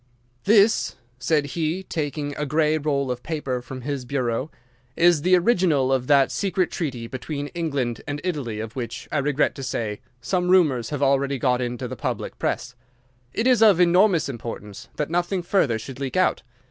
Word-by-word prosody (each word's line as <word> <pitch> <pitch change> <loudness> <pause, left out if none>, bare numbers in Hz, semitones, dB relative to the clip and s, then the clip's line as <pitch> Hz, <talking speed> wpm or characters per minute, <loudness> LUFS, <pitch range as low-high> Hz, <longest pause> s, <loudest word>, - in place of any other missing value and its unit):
"'This,' 210 +1 +4 0.2
said 150 +3 +1
he, 170 +3 -1
taking 145 -4 -3
a 150 - -3
grey 150 +1 +2
roll 140 -3 0
of 125 0 -4
paper 140 -5 -3
from 130 +1 -8
his 140 0 -3
bureau, 125 +1 -2 0.5
'is 170 -3 +5
the 185 +3 +4
original 175 - +2
of 125 -1 0
that 140 -2 +4
secret 190 -2 0
treaty 130 -9 -3
between 140 +4 -5
England 140 -9 -2
and 145 -1 -3
Italy 140 -12 -3
of 110 0 -6
which, 120 -3 -5
I 150 - +1
regret 145 +1 +1
to 135 - -8
say, 115 -3 -3 0.2
some 180 +8 -1
rumours 150 -11 +3
have 145 -1 -2
already 140 0 +2
got 125 -1 +1
into 125 +1 -3
the 130 - -6
public 110 - -4
press. 125 - -2 0.6
It 225 - -2
is 250 -3 +4
of 205 -6 +6
enormous 180 0 +4
importance 115 -4 -7
that 150 +1 -3
nothing 175 +1 0
further 155 - +2
should 130 +4 -9
leak 140 +5 -3
out. 185 - +2
145 Hz, 175 wpm, -24 LUFS, 125-175 Hz, 0.6 s, of